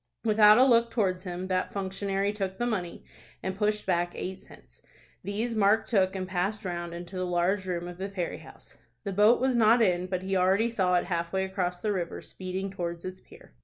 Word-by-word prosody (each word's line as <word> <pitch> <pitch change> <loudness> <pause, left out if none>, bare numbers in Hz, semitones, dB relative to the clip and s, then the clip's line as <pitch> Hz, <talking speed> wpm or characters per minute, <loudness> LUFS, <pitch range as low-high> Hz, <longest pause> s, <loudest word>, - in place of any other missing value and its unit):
Without 210 -1 +7
a 255 - +7
look 235 -2 +4
towards 190 -5 -1
him, 180 0 -4
that 185 0 0
functionary 195 +1 -2
took 190 -2 -3
the 240 - -1
money, 190 -8 -3 0.4
and 190 0 -2
pushed 210 +1 0
back 175 -1 0
eight 190 +1 -5
cents. - - -17 0.4
These 215 +5 -2
Mark 215 +1 +3
took, 190 -4 +1
and 185 -1 -3
passed 195 +3 -2
round 175 -1 -4
into 175 +2 -8
the 185 - -1
large 180 +2 0
room 175 -1 -3
of 175 0 -9
the 195 +1 -3
ferry 185 -4 -4
house. - - -15 0.2
The 200 -2 -3
boat 210 +5 +5
was 260 0 +1
not 230 +1 +5
in, 180 -5 +2
but 185 0 -3
he 195 0 -1
already 190 +5 +3
saw 185 -6 +1
it 175 - +2
halfway 175 +1 -1
across 185 -2 -2
the 210 +1 -1
river, 175 -3 -3
speeding 190 +1 -5
towards 170 -3 -5
its 185 0 -6
pier. - - -17
190 Hz, 205 wpm, -28 LUFS, 180-210 Hz, 0.4 s, Without